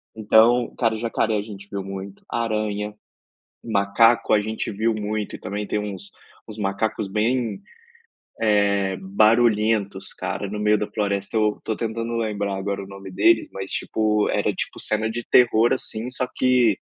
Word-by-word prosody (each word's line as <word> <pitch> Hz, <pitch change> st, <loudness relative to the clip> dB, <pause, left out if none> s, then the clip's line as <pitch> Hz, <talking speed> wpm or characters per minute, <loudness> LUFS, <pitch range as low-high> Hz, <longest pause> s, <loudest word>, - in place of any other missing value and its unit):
Então, 110 Hz, +3 st, +4 dB
cara, 115 Hz, -3 st, +1 dB
jacaré 110 Hz, -1 st, 0 dB
a -, -, 0 dB
gente 100 Hz, -1 st, -10 dB
viu 100 Hz, -1 st, -3 dB
muito. 95 Hz, 0 st, -7 dB
Aranha, 105 Hz, -2 st, -2 dB, 0.7 s
macaco 115 Hz, +2 st, +3 dB
a 105 Hz, -, +5 dB
gente 110 Hz, +1 st, -3 dB
viu 110 Hz, +3 st, 0 dB
muito. 105 Hz, 0 st, -3 dB
E -, -, -10 dB
também 100 Hz, +2 st, -4 dB
tem -, -, -1 dB
uns 100 Hz, -1 st, -5 dB, 0.4 s
uns 110 Hz, -, -8 dB
macacos 105 Hz, +1 st, -1 dB
bem, 110 Hz, +2 st, 0 dB, 1.2 s
eh, 95 Hz, -1 st, -1 dB
barulhentos, 105 Hz, 0 st, +2 dB
cara, 100 Hz, -, -4 dB
no 105 Hz, +2 st, -5 dB
meio 105 Hz, 0 st, +3 dB
da 105 Hz, -, -1 dB
floresta. 100 Hz, -1 st, -2 dB
Eu 105 Hz, -1 st, +1 dB
tô 110 Hz, -, -2 dB
tentando 115 Hz, +1 st, -3 dB
lembrar 100 Hz, -3 st, -2 dB
agora 100 Hz, +1 st, -3 dB
o 95 Hz, -, -11 dB
nome 100 Hz, -1 st, -10 dB
deles, 170 Hz, -, +3 dB
mas, 95 Hz, 0 st, -6 dB
tipo, 105 Hz, -1 st, 0 dB
era -, -, +1 dB
tipo -, -, -5 dB
cena 110 Hz, +1 st, -1 dB
de 120 Hz, +1 st, -4 dB
terror, 120 Hz, 0 st, +5 dB
assim, 115 Hz, -2 st, -4 dB
só 125 Hz, 0 st, -2 dB
que 125 Hz, -6 st, +3 dB
105 Hz, 160 wpm, -23 LUFS, 100-115 Hz, 1.2 s, a